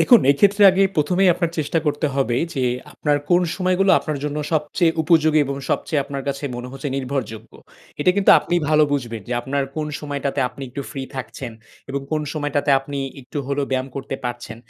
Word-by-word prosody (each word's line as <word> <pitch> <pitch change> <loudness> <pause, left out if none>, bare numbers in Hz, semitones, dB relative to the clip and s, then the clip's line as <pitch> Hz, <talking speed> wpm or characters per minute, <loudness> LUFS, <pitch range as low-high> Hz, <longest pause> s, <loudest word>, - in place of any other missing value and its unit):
দেখুন 240 -3 +7
এক্ষেত্রে 200 +8 +3
আগে 190 +1 +2
প্রথমেই 180 +5 +3
আপনার 170 -1 -1
চেষ্টা 155 +2 0
করতে 150 +1 +1
হবে 125 -4 +1 0.2
যে 135 - -1 0.3
আপনার 145 -1 0
কোন 175 - +5 0.2
সময়গুলো 185 +1 +2
আপনার 150 -2 -4
জন্য 150 0 -2 0.2
সবচেয়ে 160 +2 +1
উপযোগী 160 -1 +4
এবং 140 0 -3
সবচেয়ে 150 -3 0
আপনার 140 -1 -5
কাছে 140 +1 -3
মনে 125 +1 -6
হচ্ছে 135 +2 -5
নির্ভরযোগ্য। 130 -5 -4 0.5
এটা 165 - +4
কিন্তু 200 - +5
আপনি - - -3
ভালো 155 0 +5
বুঝবেন 120 -6 -3
যে - - -2
আপনার 140 +3 -1
কোন 155 -1 -1
সময়টাতে 140 -1 -3
আপনি 125 +3 -11
একটু 140 +3 -6
ফ্রি 135 -2 -5
থাকছেন 125 -2 -6 0.4
এবং 140 +1 -2
কোন 155 - +1
সময়টাতে 145 -2 -1
আপনি 140 +1 -6 0.2
একটু 130 +3 -7
হলেও 140 0 -1
ব্যায়াম 130 0 -1
করতে 135 0 -4
পারছেন। 120 -2 -5
145 Hz, 185 wpm, -21 LUFS, 135-155 Hz, 0.5 s, দেখুন